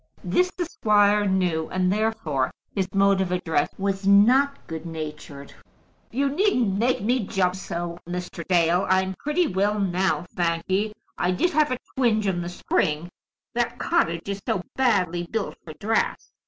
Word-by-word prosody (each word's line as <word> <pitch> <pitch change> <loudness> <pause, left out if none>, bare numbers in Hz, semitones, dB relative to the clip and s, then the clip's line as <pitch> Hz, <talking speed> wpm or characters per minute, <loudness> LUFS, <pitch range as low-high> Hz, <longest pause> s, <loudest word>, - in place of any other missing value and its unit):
This 360 0 +2
the 350 - -1
squire 210 -7 +3
knew, 180 -4 0
and 185 0 +1
therefore 210 -12 0 0.2
his 190 -2 -2
mode 195 0 +3
of 185 -2 -1
address 160 -5 0
was 195 0 -2
not 255 +8 +4
good 160 -1 -6
natured. 150 -3 -7 0.6
"You 275 +3 0
needn't 275 - +1
make 240 -3 +1
me 245 +4 +2
jump 185 -1 +1
so, 175 -2 -5
Mr. 180 -1 -5
Dale. 175 +1 +3
I'm 190 0 +2
pretty 300 +5 +1
well 205 - 0
now, 185 -1 0
thank 170 -1 0
ye. 205 +3 0 0.3
I 175 - +1
did 185 - +1
have 305 -2 +3
a 255 - 0 0.2
twinge 225 -5 +2
in 180 -3 0
the 175 - -4
spring, 165 -2 -1 0.4
that 240 0 -1
cottage 170 - 0
is 200 0 -4
so 180 - 0
badly 180 -9 +1
built 220 -2 -2
for 155 - -9
draughts! 215 +9 -1
190 Hz, 160 wpm, -24 LUFS, 175-220 Hz, 0.6 s, not